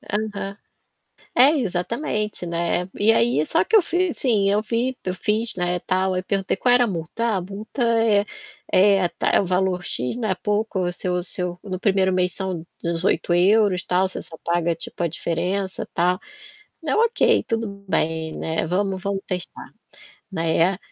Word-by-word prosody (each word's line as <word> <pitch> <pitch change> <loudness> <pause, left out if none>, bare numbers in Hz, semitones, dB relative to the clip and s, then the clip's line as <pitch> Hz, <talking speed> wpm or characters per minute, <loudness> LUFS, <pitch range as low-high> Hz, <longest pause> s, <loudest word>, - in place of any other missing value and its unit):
Aham. 210 -7 -4 0.8
É, 260 +4 +8
exatamente, 210 - -2
né. 170 +1 -1
E 215 +2 +4
aí, 225 -9 +3
só - - +2
que 450 - +1
eu 430 - +8
fiz 350 0 0
assim, 210 -6 +2
eu 205 +1 +2
fi 240 +4 -1
eu 185 - -2
fiz, 215 +5 0
né, 180 -1 -1
tal, 185 +1 0
eu 185 - -1
perguntei: 195 0 -1
"Qual 245 +5 +3
era 245 0 +6
a - - -3
multa? 175 +4 -4
'Ah, 225 -3 +1
a - - -2
multa 200 +7 -5 0.9
é 195 +1 +5
a 175 - +1
ta - - -1
é - - +4
o 195 - -2
valor 180 0 0
x, 125 - -3
não 220 -3 -2
é 190 - +1
pouco 210 +1 -1
o 180 -1 0
seu 180 0 -2
seu 180 -1 -4
no 190 -3 -4
1º 190 -1 +2
mês 180 0 +1
são 185 -4 -4 0.2
€18, 180 +3 +2
tal, 185 +1 +2
você 185 - -6
só 160 - -5
paga 170 0 0
tipo, 165 - -6
a - - +2
diferença, 180 +4 -2
tal'", 180 +2 +2 0.7
eu: - - +1
"Ok, 465 0 +3
tudo 210 -3 -3
bem, 160 -2 -1
né, 160 0 -2
vamos 190 +2 -1
vamos 200 -1 -2
testar.", 180 -2 -5 0.6
né. 165 +2 +1
190 Hz, 175 wpm, -23 LUFS, 175-210 Hz, 0.9 s, É